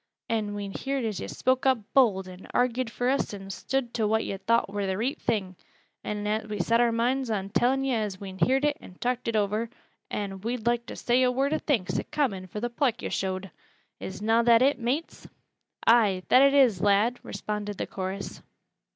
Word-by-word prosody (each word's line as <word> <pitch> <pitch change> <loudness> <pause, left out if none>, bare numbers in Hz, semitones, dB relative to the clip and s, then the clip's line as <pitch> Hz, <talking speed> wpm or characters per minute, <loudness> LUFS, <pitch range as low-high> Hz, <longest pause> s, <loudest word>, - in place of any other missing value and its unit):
An' 215 -3 -1
we 200 -1 -4
heerd 270 +4 -3
as 215 -4 -2
yo' - - -5
spoke 260 +1 0
up 260 -1 +4 0.2
bold, 205 -8 +4
an' 185 0 -11
argied 250 0 +1
for 245 +2 -2
us 260 -5 0
an' 195 -1 -8
stood 255 +3 -2
to 220 -2 +1
what 220 +1 +1
yo' 195 - -3
thowt 230 +4 +2
war 205 +1 -4
th' 190 0 -1
reet 245 +7 -2
thing, 190 -5 -1 0.5
an' 210 +1 -2
we 210 - -3
set 230 +6 +3
our 240 -1 +3
moinds 245 +3 0
on 200 -3 -2
tellin' 260 +6 +2
yo' 265 -2 +1
as 205 -3 -3
we'd 190 -2 -8
heerd 265 - +3
it 295 -1 +1
an' 180 - -13
talked 245 +4 -2
it 230 - 0
over, 215 +2 0 0.4
an' 195 -2 -4
we'd 230 +1 -3
loike 235 0 +1
to - - -7
say 245 +1 +2
a 250 -1 +4
word 270 +4 0
o' 310 - +1
thanks 235 -13 0
i' - - -3
common 200 -11 -1
fur 210 - -6
th' 240 0 -3
pluck 250 -4 0
yo' - - -2
showed. 190 0 -3 0.5
Is 190 +2 -7
na 225 +2 +4
that 235 0 +5
it, 275 0 +3
mates?" 260 +8 -3 0.6
"Ay, 210 -6 +4
that 255 - +7
it 275 0 +5
is, 240 -10 +4
lad!" 205 +5 +3
responded 210 -1 -5
the - - -2
chorus. 190 +1 -5
225 Hz, 210 wpm, -27 LUFS, 200-250 Hz, 0.6 s, that